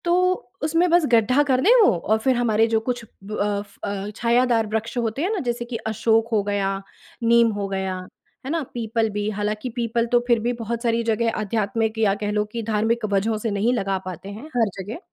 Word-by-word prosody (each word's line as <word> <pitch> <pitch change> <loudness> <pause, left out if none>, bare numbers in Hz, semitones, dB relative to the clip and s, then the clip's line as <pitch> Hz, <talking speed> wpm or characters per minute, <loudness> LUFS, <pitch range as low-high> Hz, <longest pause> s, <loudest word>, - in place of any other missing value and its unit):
तो 345 - +2 0.5
उसमें 330 +3 +2
बस 340 -1 +4
गड्ढा 245 +5 +4
कर 260 -3 +2
दें 400 - +5
वो 415 - +6
और 215 +6 +1
फिर 260 +3 +2
हमारे 225 -2 +3
जो 225 -1 +2
कुछ 240 +1 -3 0.2
ब 205 +2 -7
अफ़ 205 0 -2
अ, 200 0 -3
छायादार 235 -1 +2
वृक्ष 220 +3 -3
होते 235 +2 -1
हैं 360 - 0
ना, 415 - -1
जैसे 240 -3 -2
कि 240 0 -6
अशोक 225 +1 +2
हो 215 -2 +3
गया, 195 -1 -1 0.4
नीम 235 0 +5
हो 200 - -2
गया, 190 -1 -2 0.5
है - - -4
ना? 330 0 0
पीपल 225 -1 -1
भी, 210 0 -2
हालाँकि 210 +3 -2
पीपल 235 -1 -1
तो 240 - +5
फिर 235 -2 +4
भी 240 +2 -1
बहुत 230 +1 -3
सारी 230 0 +1
जगह 230 0 +1
आध्यात्मिक 215 +1 -1
या 210 -3 +3
कह 205 - -1
लो 210 0 +1
कि 230 0 -4
धार्मिक 225 +2 +1
वजहों 215 +3 +1
से 220 +1 -2
नहीं 205 +5 +1
लगा 195 -5 0
पाते 185 +1 -7
हैं 215 +7 -8
हर 225 -3 +3
जगह। 210 - -7
225 Hz, 215 wpm, -23 LUFS, 210-240 Hz, 0.5 s, वो